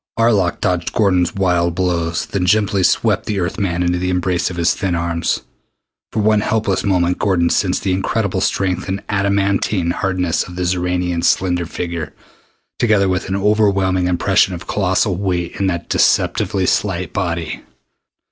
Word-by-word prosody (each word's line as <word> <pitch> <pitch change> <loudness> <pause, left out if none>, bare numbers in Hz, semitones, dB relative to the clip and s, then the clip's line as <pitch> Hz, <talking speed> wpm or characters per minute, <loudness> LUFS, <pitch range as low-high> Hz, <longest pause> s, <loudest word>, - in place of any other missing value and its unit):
Arlok 105 -6 +2
dodged 90 -2 -1
Gordon's 90 -6 +2
wild 90 -3 +1
blows, 85 -2 -1
then 90 -2 -2
gently 100 0 +2
swept - - +1
the 105 -2 -1
Earth 90 +4 -2
man 90 -3 0
into 90 0 0
the 90 0 -1
embrace 90 -1 0
of 90 - -7
his 85 0 +2
thin 95 -4 -2
arms. 85 0 -1 0.7
For 110 - -1
one 105 0 +3
helpless 105 -3 0
moment 90 -3 +1
Gordon 90 -4 +1
sensed - - 0
the 95 - +1
incredible 95 0 -1
strength 95 -2 -1
and 95 +1 -3
adamantine 100 -2 +1
hardness 90 -2 -1
of 90 - -10
the 90 - -2
Xoranian's 90 -1 0
slender 90 -2 0
figure, 85 -2 -5 0.6
together 110 -4 +3
with 95 0 -1
an 95 - -1
overwhelming 100 -3 +2
impression 90 +1 +2
of 85 - -9
colossal 95 0 0
weight 90 -3 -2
in 100 - +1
that 85 -2 -2
deceptively 95 -2 +1
slight 90 -2 -1
body. 85 -4 -3
90 Hz, 155 wpm, -18 LUFS, 85-100 Hz, 0.7 s, one